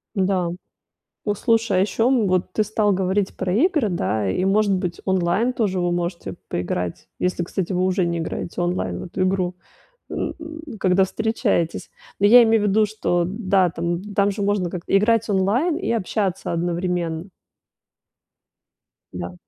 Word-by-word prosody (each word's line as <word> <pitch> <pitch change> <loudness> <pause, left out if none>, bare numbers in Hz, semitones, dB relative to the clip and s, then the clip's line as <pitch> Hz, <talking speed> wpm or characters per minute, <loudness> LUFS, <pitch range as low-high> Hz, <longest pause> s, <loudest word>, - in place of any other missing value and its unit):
Да. 190 -3 +1 0.7
Вот 205 -2 -1
слушай, 230 -4 +2
а - - +4
ещё, 220 +4 +1
м, 250 -5 +3
вот 185 -1 0
ты 215 - +2
стал 210 -1 +1
говорить 190 +1 0
про 185 -1 -1
игры, 300 - +2
да, 110 - -1
и, 140 - 0
может 200 +1 +3
быть, 180 -2 -2
онлайн 190 +6 +1
тоже 200 -6 0
вы 175 0 0
можете 175 0 -3 0.2
поиграть, 90 0 -3
если, 180 -1 0
кстати, 185 +1 -3
вы 180 0 +1
уже 185 0 +1
не 170 0 -1
играете 165 +1 -4
онлайн 175 +1 -1
в - - -6
эту 185 +1 -5
игру, 185 -1 0 0.5
н - - -3
н 315 -5 -9
когда 190 0 +3
встречаетесь. 215 -4 -1 0.3
Ну, 200 - +3
я 245 +4 +9
имею 225 -2 +3
в - - +2
виду, 215 +2 +3
что, 175 -4 0
да, 190 -2 +1
там, 170 +1 -2
там, 200 0 +3
же 200 - -5
можно 200 -3 0
как-то 180 +2 +1
играть 230 +2 +2
онлайн 215 - +1
и 370 - -2
общаться 200 -3 -1
одновременно. 170 -1 -2 1.9
Да. 90 -1 -5
190 Hz, 165 wpm, -22 LUFS, 175-215 Hz, 1.9 s, я